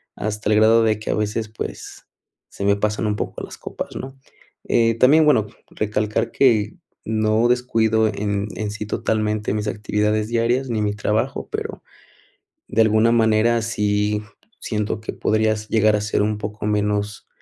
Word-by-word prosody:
hasta 105 0 -3
el - - +4
grado 115 +1 +5
de 110 -1 +1
que 110 - -7
a - - +1
veces, 105 +1 -2
pues, 110 - -7 0.4
se 100 - -5
me 100 0 +4
pasan 105 +1 -1
un 105 - 0
poco - - -5
las - - -9
copas, - - -7
¿no? 135 +1 -7 0.5
Eh, 115 -1 +3
también, 150 +4 +6
bueno, 110 -8 +3 0.2
recalcar 105 +2 -1
que 115 - +2 0.3
no 110 +1 +2
descuido 110 -3 +2
en 100 -1 -2
en 105 -1 -3
sí 105 0 -5
totalmente 105 -1 -1
mis 105 0 -2
actividades 105 0 0
diarias, 120 +3 0
ni 110 -2 -1
mi 105 0 0
trabajo, 110 +5 -2
pero, 435 +1 -5 0.9
de 115 - +2
alguna 110 +1 +4
manera, 115 +1 +3
sí 105 -2 0 0.4
siento 105 -1 -2
que - - -5
podrías 110 0 0
llegar 110 -1 +3
a 105 - -1
ser 105 0 0
un 105 0 0
poco 105 0 -6
menos 105 0 -1
110 Hz, 160 wpm, -21 LUFS, 105-115 Hz, 0.9 s, también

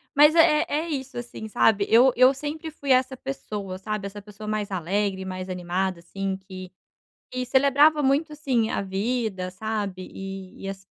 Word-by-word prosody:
Mas 300 +2 +7
é 310 -2 +5
é 310 +3 -1
isso, 265 -4 -4
assim, 235 -2 -7
sabe, 205 -1 +3
eu 245 +3 +6
eu 255 +2 +6
sempre 305 +3 -5
fui 285 -2 -8
essa 255 0 +3
pessoa, 210 -9 -5
sabe, 205 0 -4
essa 205 +1 -9
pessoa 210 +1 -10
mais 210 -2 -2
alegre 190 +2 -1
e - - -8
mais 185 0 -5
animada, 180 0 -2
assim, 195 +2 -4
que 185 -1 -10 0.6
que 255 0 -2
celebrava 280 +4 +4
muito, 290 +4 +2
assim, 255 -7 0
a - - -1
vida, 195 -1 -2
sabe, 200 -1 -4
e 195 -1 -8
e 195 - -3
as 195 0 -8
215 Hz, 175 wpm, -25 LUFS, 190-265 Hz, 0.6 s, Mas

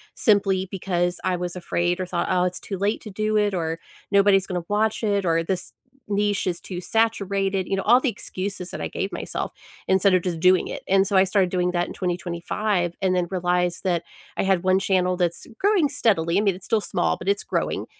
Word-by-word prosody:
simply 195 -4 +2
because 175 -2 -1
I 185 -1 +1
was 180 0 -4
afraid 175 +1 -1
or 185 - -1
thought, 175 -1 -2
"Oh, 180 0 +3
it's 180 0 -2
too 195 - -5
late 205 +3 0
to 215 - -9
do 215 +2 -1
it," 205 -1 +2
or, 165 -2 -2 0.3
"Nobody's 200 -1 +4
gonna 180 -3 -3
watch 215 +2 0
it," 200 -2 +1
or, 165 -1 +2
"This 180 +1 -3 0.4
niche 205 -1 0
is 175 -1 -1
too 180 -2 -6
saturated." 200 -3 0
You 195 - 0
know, 195 - -2
all 240 +4 +6
the 260 - 0
excuses 195 -4 -5
that - - -6
I - - -2
gave - - -4
myself - - -4 0.4
instead 190 0 +4
of 180 - +3
just 170 -3 -2
doing 185 +1 +4
it. - - -6
And 195 0 +4
so 200 - -1
I 190 - +6
started 190 -1 +2
doing 180 -1 +1
that 175 0 0
in - - -7
2025, 175 +1 -2
and 185 -1 +3
then 175 -1 0
realized 180 -1 0
that 175 -3 0 0.3
I - - +1
had 190 -2 +2
one 185 +1 +3
channel 185 -2 +1
that's 175 -2 -1
growing 395 -7 +3
steadily, 195 - +1
I - - +3
mean, 200 -3 +2
it's 185 - -11
still 220 -2 +1
small, 80 - 0
but - - -9
it's 200 - +1
growing. - - -2
190 Hz, 220 wpm, -24 LUFS, 180-200 Hz, 0.4 s, all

